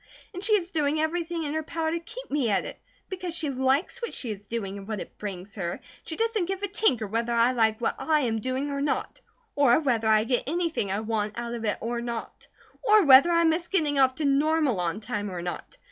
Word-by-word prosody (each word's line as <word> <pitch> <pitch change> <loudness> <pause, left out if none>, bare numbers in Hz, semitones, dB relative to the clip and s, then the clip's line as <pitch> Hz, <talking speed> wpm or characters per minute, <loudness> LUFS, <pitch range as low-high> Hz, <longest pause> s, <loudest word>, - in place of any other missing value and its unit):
And 365 +1 -6
she 430 - +3
is 365 -4 +1
doing 300 -1 +1
everything 330 +1 -1
in 295 -1 -3
her 315 - -1
power 320 +1 -2
to 335 - -1
keep 460 +9 -10
me 280 -6 +1
at 195 - +1
it, - - -8 0.3
because 365 -3 -5
she 310 -4 -1
likes 270 - 0
what 470 - -3
she 240 - -1
is 205 0 -8
doing 200 -4 -4
and 195 - -11
what 215 -2 -3
it - - -9
brings 195 -1 -6
her, 175 -4 -3
and - - -9 0.2
she 320 - -5
doesn't 450 -4 0
give 385 +1 -4
a - - +1
tinker 390 - +1
whether 230 +3 -2
I 235 +1 +4
like 220 -3 +2
what 235 - -1
I 310 -2 +2
am 225 -4 0
doing 260 +3 -2
or 280 0 -2
not; 290 - -2 0.3
or 275 -3 +5
whether 240 -7 0
I 215 0 +5
get 245 +2 0
anything 330 - -1
I 200 +2 -1
want 215 -1 -2
out 235 0 -4
of 230 -1 -4
it 210 - 0
or 235 +1 -2
not; 235 -1 -6 0.3
or 425 -5 +5
whether 275 +4 +8
I 335 0 +3
miss 330 +1 +1
getting 300 -7 +1
off 260 -1 +4
to 305 - -2
Normal 285 - +2
on 175 +4 -2
time 210 -3 -3
or 175 -2 -5
not. 175 - -6
270 Hz, 240 wpm, -26 LUFS, 225-330 Hz, 0.3 s, whether